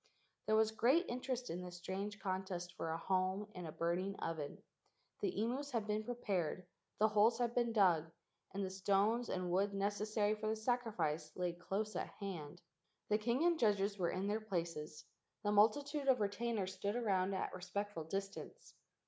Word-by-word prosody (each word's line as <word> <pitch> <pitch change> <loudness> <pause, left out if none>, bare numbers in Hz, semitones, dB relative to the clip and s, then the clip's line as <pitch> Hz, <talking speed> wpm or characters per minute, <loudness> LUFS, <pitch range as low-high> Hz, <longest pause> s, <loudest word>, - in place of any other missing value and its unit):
There 215 - +4
was 220 0 +4
great 260 +11 +4
interest 250 0 -2
in 175 +2 -3
this 180 -1 -7
strange 195 +3 -4
contest 185 -2 -3
for 165 - -3
a 160 - -1
home 190 +3 0
in 180 -2 -6
a - - -5
burning 175 +5 -1
oven. 160 -5 -4 0.6
The 400 -3 0
imus 255 +6 -1
had 225 -3 +1
been 210 0 0
prepared: 190 -8 -1 0.3
the 215 - +5
holes 215 +2 +5
had 240 -1 0
been 240 -1 +2
dug, 175 -7 +4 0.4
and 195 0 -2
the 185 - -4
stones 200 +5 +2
and 180 -1 -1
wood 200 +2 +2
necessary 205 +1 +1
for 215 0 -3
the 220 - +1
sacrifice 220 -9 0
laid 175 -1 -2
close 210 +4 -2
at - - -2
hand. 175 -4 -6 0.5
The 210 0 +3
king 240 +7 +1
and 340 -2 +4
judges 205 -3 +2
were 175 -2 +2
in 185 +1 -1
their 210 +2 0
places. 165 -7 -3 0.4
The 205 - +2
multitude 280 +8 +3
of 260 -2 +5
retainers 205 -1 -1
stood 200 +2 -2
around 195 -5 +1
at 190 - -2
a - - -4
respect¬ 200 +3 -3
ful 160 -4 -4
distance. 195 +4 -5
200 Hz, 180 wpm, -38 LUFS, 185-220 Hz, 0.6 s, the